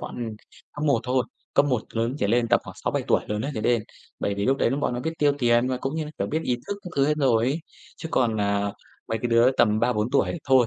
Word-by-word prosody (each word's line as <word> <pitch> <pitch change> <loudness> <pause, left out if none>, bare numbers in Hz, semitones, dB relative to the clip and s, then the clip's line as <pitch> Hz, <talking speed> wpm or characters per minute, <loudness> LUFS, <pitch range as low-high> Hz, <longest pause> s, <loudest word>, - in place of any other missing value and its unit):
bọn - - -6 0.6
cấp 150 - -4
1 140 -6 +3
thôi, 125 0 +1 0.3
cấp 145 - +5
1 125 -6 +1
lớn 115 +3 -1
trở 100 - +1
lên 115 +2 +2
tầm 120 - +4
khoảng - - -10
6-7 - - 0
tuổi - - +4
lớn 105 0 -1
ấy 140 - -2
trở 110 - -2
lên. 120 -1 +2 0.4
Bởi 100 - 0
vì 100 0 -2
lúc 135 +1 +3
đấy - - +2
lúc 140 +2 -1
bọn 125 - 0
nó 120 - -3
biết 160 +5 -2
tiêu 145 -1 +4
tiền 120 0 +3
và 130 - 0
cũng 135 +3 -3
như 160 -1 -2
là, 150 - -7
kiểu, - - 0
biết 160 +1 -1
ý 125 - 0
thức 205 - -2
các 180 - -8
thứ 140 0 +4
hết 150 - +2
rồi 120 -5 +3
ấy. 140 +6 0 0.4
Chứ 160 - -6
còn, 115 -4 +2
à, 100 0 0 0.4
mấy 115 - -1
cái 120 - 0
đứa 115 +2 +5
tầm 110 -5 +2
3-4 120 -1 +1
tuổi 140 - +2
thì 175 - -5
thôi, 130 -3 +6
125 Hz, 285 wpm, -25 LUFS, 115-140 Hz, 0.6 s, thôi